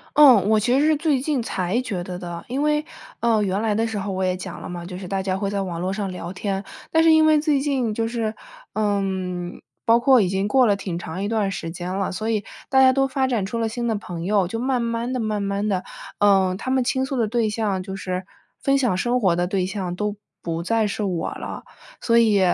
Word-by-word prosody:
嗯， 250 -10 +7
我 220 0 +4
其 245 +5 +2
实 295 - +3
是 310 -1 +4
最 295 -4 +1
近 275 -3 0
才 190 +2 -1
觉 190 -8 -3
得 180 0 -6
的， 175 -1 -7
因 270 +4 -1
为， 300 0 +2 0.4
呃， 225 -3 +3
原 195 0 0
来 220 -2 +1
的 225 +2 +1
时 220 -2 -3
候 195 +1 -3
我 190 0 -1
也 185 0 +1
讲 180 -1 -7
了 - - -7
嘛， 175 -1 -6
就 180 0 -7
是 190 - -7
大 195 +1 -2
家 190 -1 -1
会 200 0 -2
在 200 0 -1
网 170 -3 -4
络 185 +2 -1
上 195 -1 -3
聊 180 -1 -6
天， 195 0 -3 0.3
但 320 0 +4
是 325 -1 +6
因 315 0 +6
为 310 -1 +5
最 295 -3 +2
近 270 -6 0
就 225 +1 -1
是， 225 -2 -2 0.4
嗯， 190 -4 -2 0.2
包 230 +1 +5
括 255 -1 +6
已 185 - +2
经 195 +2 0
过 260 +2 +4
了 205 - +4
挺 185 -3 -4
长 180 +2 -5
一 205 - -1
段 215 -3 0
时 165 -4 -4
间 180 +2 -5
了， 195 0 -1
所 215 +4 -3
以 210 -2 0 0.2
大 265 0 +4
家 260 0 +7
都 270 0 +2
发 265 0 0
展 235 -6 0
出 230 +3 -3
了 225 -1 0
新 235 +1 -3
的 225 - +1
朋 175 -4 -6
友。 195 -2 +2
就 225 - -4
慢 255 0 0
慢 235 +2 -2
地 255 - -1
慢 215 -2 -1
慢 200 +1 -1
地， 185 -2 0 0.4
嗯， 195 -2 +4
他 260 - -4
们 260 -1 +2
倾 260 +1 0
诉 265 0 -3
的 230 -3 +1
对 230 -1 +1
象， 210 -3 -1
就 190 +1 -6
是 185 -1 -4 0.4
分 275 0 +3
享 245 -9 +1
生 245 +5 +1
活 180 -5 +3
的 175 0 +1
对 185 -1 0
象 185 -2 -3
都 210 +2 -2 0.3
不 165 0 -3
再 225 +3 +1
是 210 +1 -3
我 180 -4 -1
了， - - -7 0.4
所 230 -1 +3
以， 215 -4 +4
210 Hz, 270 characters per minute, -23 LUFS, 185-240 Hz, 0.4 s, 嗯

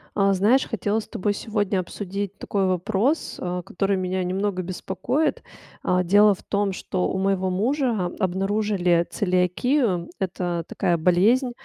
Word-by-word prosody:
А, 195 -1 +3
знаешь, 215 +8 +3
хотела 215 -1 -1
с - - -8
тобой 205 +2 -1
сегодня 205 -2 -1
обсудить 200 +2 -5
такой 200 -1 -1
вопрос, 195 - 0
а, 180 0 -3
который 195 +3 -1
меня 185 0 -1
немного 185 +1 -1
беспокоит. 245 - -2 0.4
А, 180 0 +2
дело 205 +3 +5
в 190 - -12
том, 200 -1 0
что 185 0 -2
у - - -2
моего 190 -1 +1
мужа 225 0 0
обнаружили 190 -2 +1
целиакию- 185 - +1
это 175 -2 -2
такая 170 - 0
болезнь, 205 +10 +3
195 Hz, 140 wpm, -24 LUFS, 180-210 Hz, 0.4 s, дело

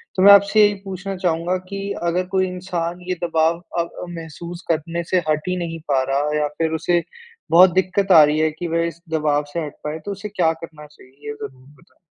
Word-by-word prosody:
तो 185 - +2
मैं 200 - +10
आपसे 200 +2 +5
यही 205 - +2
पूछना 195 0 -5
चाहूँगा 180 0 0
कि 195 0 -5 0.3
अगर 180 +2 0
कोई 185 0 +2
इंसान 180 -1 -4
ये 185 - 0
दबाव 165 0 +2 0.2
अब 170 - -1
अ, - - -5
महसूस 170 +1 -8
करने 165 +2 -2
से 185 - +5
हट 155 +3 0
ही 180 - 0
नहीं 165 -2 -4
पा 135 -1 +3
रहा 145 +2 0
या 150 - +1
फिर 160 -1 0
उसे 175 0 +2 0.5
बहुत 180 +2 +8
दिक्कत 190 +1 +1
आ 155 -3 +9
रही 150 +1 +2
है 155 0 +2
कि 170 +3 -6
वह 165 0 0
इस 170 0 -8
दबाव 150 -2 +1
से 170 - -1
हट 145 - -8
पाए, 150 +1 -4
तो 205 - -6
उसे 200 +2 -6
क्या 180 -5 +2
करना 160 -2 -11
चाहिए? 145 -3 -19 0.2
ये 145 - -3
ज़रूर 130 -2 -10
बताएँ। - - -26
170 Hz, 225 wpm, -21 LUFS, 155-185 Hz, 0.5 s, मैं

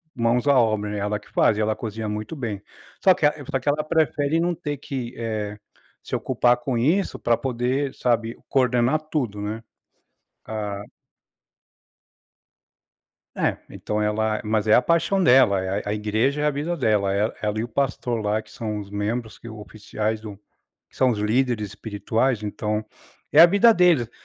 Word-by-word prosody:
mãos 120 +3 +1
à 140 -2 +5
obra, 110 -2 +1
né, 105 - -3
ela 105 +1 -1
que 105 - -20
faz. 105 - +2
Ela 110 0 0
cozinha 110 -1 -5
muito 105 +8 -5
bem. 110 -8 -4 0.4
Só 190 - +7
que 170 - 0
a 150 - +4 0.2
só 135 - 0
que 140 - -1
ela 150 +1 +1
prefere 155 0 +1
não 175 +1 +1
ter 150 -3 -4
que, 130 -3 -5
eh, 110 -2 -3 0.5
se - - -4
ocupar 120 0 +2
com 120 0 -2
isso 160 +12 +1
pra 120 -1 +2
poder, 130 +2 -1
sabe, 115 -1 0
coordenar 125 +2 +2
tudo, 115 -9 -2
né. 110 +2 -4 0.8
A 105 -2 -4 2.5
É. - - 0
Então, 105 0 -3
ela 110 0 0
mas 110 0 0
é 110 - +5
a 125 - +6
paixão 170 +3 +2
dela. 125 - +5
É 95 +2 -1
é - - -3
a 105 - 0
igreja 110 +7 0
é 150 - +1
a - - +4
vida 150 +5 -2
dela. 105 -8 +1
E 105 +3 +1
ela 105 0 -1
e - - -1
o - - -4
pastor 125 -1 -1
lá 105 +1 0
que - - -20
são 110 -2 -4
os 100 - -9
membros 110 +3 -3
que - - -11
oficiais 110 0 -4
do 105 -2 -9 0.5
que - - -26
são 130 -1 +4
os 110 - -3
líderes 110 0 0
espirituais, 110 +3 -1
então, 105 +1 -3 0.5
é 150 - +5
a 170 - +12
vida 200 +6 +5
deles. 170 - +3
115 Hz, 180 wpm, -23 LUFS, 105-135 Hz, 2.5 s, a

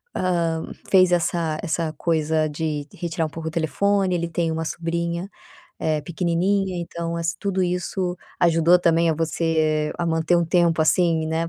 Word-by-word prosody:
hã, 170 -3 0 0.3
fez 185 -2 +5
essa 170 -2 0
essa 165 -2 -1
coisa 155 0 0
de 150 -1 -3
retirar 165 -1 -2
um - - -4
pouco 160 +1 -7
o - - -10
telefone, 185 +5 +1
ele 170 -1 -1
tem 165 0 -1
uma 160 0 -2
sobrinha, 170 +2 -3 0.5
eh, 155 -1 0
pequenininha, 180 +3 0
então 170 0 -4
ass 170 +1 -1
tudo 190 -2 -1
isso 180 0 -2 0.2
ajudou 170 0 +5
também, 170 -1 +3
a - - 0
você 155 -1 0
a 175 - -1
manter 160 +1 +2
um 170 - +2
tempo, 170 -1 +2
assim, 160 0 +2
né, 165 +1 -1
170 Hz, 160 wpm, -23 LUFS, 160-175 Hz, 0.5 s, fez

